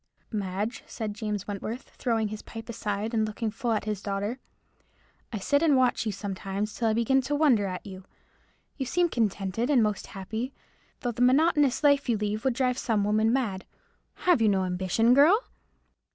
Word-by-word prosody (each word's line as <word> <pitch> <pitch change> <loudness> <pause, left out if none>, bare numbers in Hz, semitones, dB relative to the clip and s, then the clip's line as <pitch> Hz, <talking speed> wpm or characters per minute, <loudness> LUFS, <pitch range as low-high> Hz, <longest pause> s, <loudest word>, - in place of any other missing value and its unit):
"Madge," 205 +1 -3
said 215 -3 -4
James 205 -2 -4
Wentworth, 215 +5 -5
throwing 225 -4 -1
his 215 0 -6
pipe 225 0 -9
aside, 215 0 -3
and 220 -1 +2
looking 215 +1 -2
full 235 +2 -2
at 220 - 0
his 210 -2 -3
daughter, 205 +5 -3 0.9
"I 220 - -3
sit 285 +8 +1
and 305 -5 +4
watch 250 -2 +2
you - - +1
sometimes 200 +1 -4
till 230 +1 -1
I 220 - +3
begin 235 +4 +2
to 275 +3 -2
wonder 260 -10 +3
at 180 -1 -5
you. 190 -2 -9 0.7
You 265 -3 -3
seem 350 +5 +2
contented 215 - -1
and 260 -6 +4
most 210 -2 -1
happy, 220 +7 -5 0.5
though 245 - -1
the 240 - -5
monotonous 290 +2 +4
life 285 -2 +4
you 230 - +3
lead 210 +1 -2
would 260 -3 +1
drive 255 0 +1
some 220 -4 +1
women 215 +2 +2
mad. 225 -8 -1 0.6
Have 355 -9 +4
you 220 - +5
no 190 -2 +2
ambition, 185 +6 +2
girl?" 305 - +6
220 Hz, 180 wpm, -27 LUFS, 205-255 Hz, 0.9 s, girl